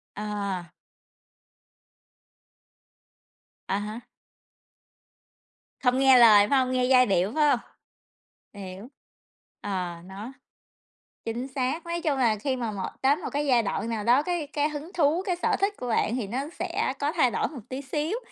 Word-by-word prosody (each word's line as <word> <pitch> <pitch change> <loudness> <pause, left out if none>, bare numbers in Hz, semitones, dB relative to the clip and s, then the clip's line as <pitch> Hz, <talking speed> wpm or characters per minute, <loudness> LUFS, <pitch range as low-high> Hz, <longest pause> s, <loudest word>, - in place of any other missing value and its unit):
À. 200 -5 -4 3.0
À 195 - 0
há. 210 +3 -6 1.8
Không 250 0 +2
nghe 265 -1 +7
lời, 215 -4 +7
phải 280 - +4
hông? 255 -1 0
Nghe 255 -1 +1
giai 255 0 +5
điệu, 190 -1 +1
phải 300 -1 +4
hông? - - +3 0.9
Hiểu, 195 +1 -9 0.7
ờ, 185 -4 -3
nó 200 +6 -8 0.9
chính 235 +3 -3
xác. 270 +4 -2
Nói 340 0 -3
chung 300 -5 0
là 235 -4 +3
khi 260 +6 -1
mà 235 -3 -3
một 195 -2 -4
tới 270 +2 +4
một - - -6
cái 290 +1 0
giai 245 -4 +3
đoạn 220 +2 -2
nào 225 -2 -2
đó, 245 +6 +4
cái 345 -3 -2
cái 295 +1 0
hứng 300 +4 -7
thú, 330 +2 +2
cái 360 - 0
sở 350 - 0
thích 400 +1 +2
của 250 - -6
bạn 225 0 +1
thì 240 -6 -3
nó 240 +6 -3 0.2
sẽ - - -1
có 290 +1 0
thay 260 -8 +3
đổi - - 0
một 280 -6 -9
tí 260 +1 -4
xíu, 300 +8 -2
255 Hz, 160 wpm, -26 LUFS, 210-290 Hz, 3.0 s, nghe